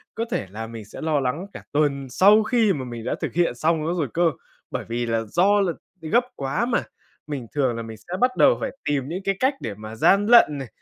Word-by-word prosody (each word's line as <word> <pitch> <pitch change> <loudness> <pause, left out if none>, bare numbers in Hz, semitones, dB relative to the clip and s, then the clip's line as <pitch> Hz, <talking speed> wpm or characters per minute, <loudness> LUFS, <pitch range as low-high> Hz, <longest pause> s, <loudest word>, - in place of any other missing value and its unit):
Có 230 - -2
thể 100 - -2
là 110 +3 -6
mình 115 -2 -9
sẽ 105 - -10
lo 155 -2 +1
lắng 140 +7 -2
cả - - -9
tuần 140 -2 0
sau 205 - +5
khi 220 -2 +2
mà 135 -6 -4
mình 120 -2 -7
đã - - -1
thực - - -3
hiện 170 -7 +1
xong 155 +4 0
nó 165 - 0
rồi 165 -5 -1
cơ. 170 -1 +3 0.4
Bởi - - -4
vì 120 +1 -2
là 115 -1 0
do 185 - +2
là 180 -4 0 0.3
gấp 165 +10 +2
quá 140 - -1
mà, 240 -1 0 0.4
mình 140 -6 -5
thường 130 -5 +1
là 115 - -4
mình 110 -1 -9
sẽ 175 - -6
bắt 250 0 +2
đầu - - +5
phải - - -2 0.2
tìm 140 -3 0
những 180 +5 -5
cái 195 0 0
cách 265 +2 +2
để 105 - -4
mà 110 +2 -9
gian 195 - +4
lận 230 -10 +6
này, 135 -2 -6
150 Hz, 250 wpm, -23 LUFS, 120-195 Hz, 0.4 s, lận